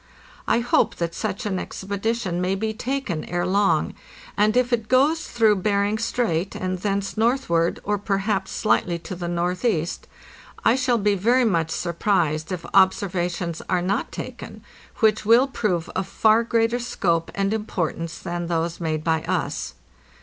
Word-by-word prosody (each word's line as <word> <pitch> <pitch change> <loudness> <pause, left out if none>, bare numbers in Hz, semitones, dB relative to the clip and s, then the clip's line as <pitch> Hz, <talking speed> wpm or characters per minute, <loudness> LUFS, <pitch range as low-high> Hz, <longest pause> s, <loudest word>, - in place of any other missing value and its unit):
I 235 - +3
hope 240 - +2
that 170 -1 -3
such 215 +4 -3
an 190 -3 -1
ex - - -7
pedition 200 -2 -2
may 185 +1 +1
be 220 +3 -2
undertaken 220 - -3
ere 175 0 -1
long, 185 -4 +2 0.4
and 215 +3 +3
if 250 0 +2
it 225 -2 0
goes 285 +6 +3
through 220 -3 +3
Bering 205 +2 +1
Strait 205 -6 -1
and 185 0 -3
thence 200 +1 -2
northward, 220 -8 +1
or 205 0 -1
perhaps 195 -1 -1
slightly 175 -5 +1
to 170 +2 -7
the 175 -1 -5
northeast, 175 +1 -1 0.6
J 225 - +5
shall 255 -2 +2
be 205 -1 +2
very 240 +6 +3
much 165 -7 +1
surprised 170 -2 0
if 180 -2 -4
observations 180 -3 +1
are 180 -2 +1
not 195 +3 -1
taken - - -8 0.4
which 215 -1 +3
will 230 +5 +6
prove 210 -10 -1
of 190 0 -3
far 220 +3 +4
greater 230 +1 +1
scope 170 -8 0
and 195 +1 0
importance 170 -6 -3
than 175 0 -4
those 165 0 -1
made 155 -2 -1
by 160 -1 +1
us. - - -2
195 Hz, 155 wpm, -23 LUFS, 175-220 Hz, 0.6 s, will